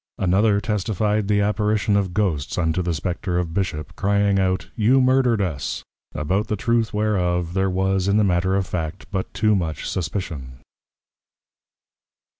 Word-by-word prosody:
Another 100 +3 +3
testifi'd, 105 -1 0
the 100 -1 +2
Apparition 105 0 +1
of 100 -3 +1
Ghosts 85 -8 -1
unto 80 0 +1
the 85 -2 -1
Spectre 90 +2 -2
of 85 -2 -2
Bishop, 85 -6 -3
crying 100 0 +2
out, 95 -1 -1
You 120 +4 +4
Murdered 130 -4 +3
us! 80 -7 -3 0.3
About 95 +8 0
the 105 - -1
Truth 115 -1 0
whereof, 90 -5 0
there 95 0 +1
was 95 0 0
in 100 +1 +3
the 110 - +4
Matter 95 0 +1
of 95 -1 +1
Fact 85 0 -4
but 95 -1 -3
too 110 -1 +2
much 80 -5 -2
suspicion. 80 -7 -4
95 Hz, 150 wpm, -22 LUFS, 90-105 Hz, 0.3 s, You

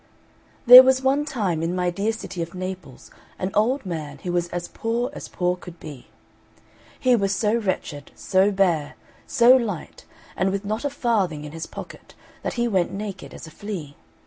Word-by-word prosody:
There 250 +1 +13
was 260 0 +2
one 275 +3 +2
time 200 - -2
in 170 +2 -1
my 180 -1 0
dear 200 +5 -1
city 200 -5 -6
of 170 +2 -6
Naples 185 -7 -7 0.3
an 185 +1 -3
old 240 +4 +1
man 155 -5 -5
who 180 - -3
was 175 -1 0
as 175 0 -5
poor 235 +2 -2
as - - -8
poor 180 -1 -1
could 175 -1 -12
be. 145 -5 -10 0.9
He 255 -1 +4
was 200 -3 0
so 210 +1 +1
wretched, 185 -9 -3
so 190 +1 +2
bare, 175 -7 +1 0.3
so 245 +2 +6
light, 220 -9 -3 0.3
and 190 - +1
with 200 +1 -3
not 215 +3 -3
a 285 - 0
farthing 200 - -1
in 150 - -8
his 165 +1 -6
pocket, - - -11 0.3
that - - -3
he 240 -2 0
went 185 -6 0
naked 195 -1 -6
as - - -10
a 155 - -12
flea. 170 -8 -7
190 Hz, 185 wpm, -23 LUFS, 175-230 Hz, 0.9 s, There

